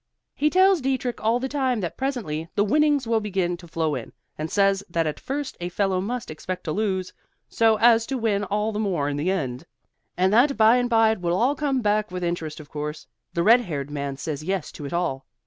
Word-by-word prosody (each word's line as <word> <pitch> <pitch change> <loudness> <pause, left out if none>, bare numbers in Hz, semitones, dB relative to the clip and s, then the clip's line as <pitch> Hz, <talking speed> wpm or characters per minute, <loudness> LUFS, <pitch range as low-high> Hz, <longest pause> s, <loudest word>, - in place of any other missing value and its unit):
He 300 - +1
tells 375 0 +4
Dietrich 260 -3 -2
all 230 +2 +2
the 265 - -2
time 265 -4 0
that 175 - -4
presently 205 - -3
the 205 - +3
winnings 295 +4 +2
will 225 -1 +2
begin 190 -4 -1
to 175 0 -13
flow 160 -2 -1
in, - - -6 0.2
and 155 +1 -4
says 195 0 +2
that 170 -1 0
at 155 - -3
first 280 0 -4
a 175 0 -3
fellow 190 0 0
must 235 +1 -4
expect 180 +4 -5
to 155 - -3
lose, 190 -1 -1 0.4
so 225 -1 +3
as 230 0 +5
to 270 - -2
win 215 -4 0
all 210 +2 -1
the 210 - -3
more 180 -9 0
in 145 - -3
the 155 +5 0
end, 135 -9 -2 0.5
and 185 +2 +2
that 270 +5 +4
bye 220 +2 +6
and 245 -1 0
bye 225 -2 +4
it 220 -4 -3
will 175 0 0
all 250 +7 +3
come 275 -3 -1
back; 210 0 +1
with 180 0 -5
interest, 170 -3 -3
of 150 - -11
course. 150 +1 -5 0.3
The 170 - +1
red 235 +6 +6
haired 145 - -5
man 140 -2 -4
says 150 +1 -4
yes 185 -1 -2
to 145 - -8
it - - -8
all. 155 -7 -2
200 Hz, 230 wpm, -24 LUFS, 170-240 Hz, 0.5 s, bye